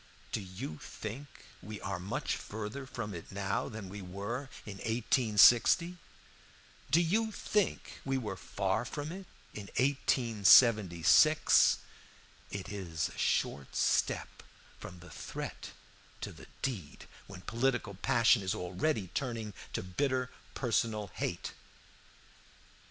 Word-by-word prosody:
Do - - -1
you 95 - -7
think 120 +7 -7 0.3
we 105 +2 -7
are 95 0 -4
much 95 +3 -2
further 110 +6 -6
from 110 -5 -5
it 85 - -8
now 100 0 -2
than 110 -3 -7
we 100 +2 -7
were 100 +9 -5 0.2
in 100 -2 -7
1860? 120 - +4 0.9
Do 160 - +5
you 215 +7 +1
think 210 -2 -1
we 135 -1 0
were 105 -6 -3
far 95 +2 -1
from 145 +4 -5
it 190 +1 -8 0.3
in 100 -1 -7
1876? 115 - +5 0.7
It 100 -2 -6
is 85 -5 -3
a - - -13
short 70 -1 0
step - - +1 0.4
from 90 -1 -10
the 90 - -13
threat - - -6 0.5
to - - -4
the - - -13 0.2
deed 100 - -4 0.2
when 95 -2 -10
political 120 -1 0
passion 115 +3 +4
is 95 +2 -1
already 95 - -1
turning 115 -5 -3 0.2
to - - -2
bitter 125 +7 -1 0.2
personal 110 -5 0
hate. - - -3
110 Hz, 120 wpm, -32 LUFS, 95-130 Hz, 0.9 s, Do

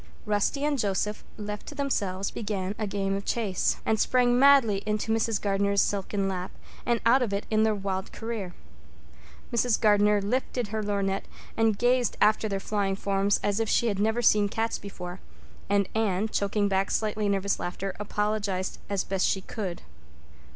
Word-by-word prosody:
Rusty 210 +7 0
and 295 -2 0
Joseph, 210 0 -1
left 210 -1 -6
to 295 - -8
themselves, 200 -10 -1
began 200 -3 -3
a 215 - -1
game 195 -1 -1
of 200 - -4
chase, 205 -6 0
and 220 -1 +1
sprang 245 0 +3
madly 265 -8 +5
into 215 +1 -1
Mrs. 225 -1 +1
Gardner's 200 0 +1
silken 195 0 0
lap 185 -1 -3 0.4
and 235 -1 +2
out 250 +3 +5
of 225 -5 -1
it 200 - -2
in 215 0 +3
their 220 -1 +3
wild 195 -1 -3
career. 220 -6 -5 1.0
Mrs. 235 -1 +2
Gardner 210 -1 +4
lifted 240 +2 -2
her 220 +1 -2
lorgnette 200 -2 -1 0.3
and 225 -2 +2
gazed 245 0 +2
after 215 +1 +3
their 195 -1 -1
flying 195 -1 -1
forms 195 0 +1
as 205 +1 +1
if 225 -2 0
she 235 - +3
had 200 -2 -2
never 220 +3 +1
seen 210 -2 +4
cats 225 +2 -1
before, 180 -2 -8 0.5
and 200 -1 +2
Anne, 215 -2 +1
choking 205 0 0
back 195 0 +1
slightly 215 -1 0
nervous 200 0 0
laughter, 185 +2 -4
apologized 210 -2 -2
as 200 -2 0
best 190 -1 0
she 195 - 0
could. 190 -3 -5
205 Hz, 170 wpm, -27 LUFS, 195-220 Hz, 1.0 s, madly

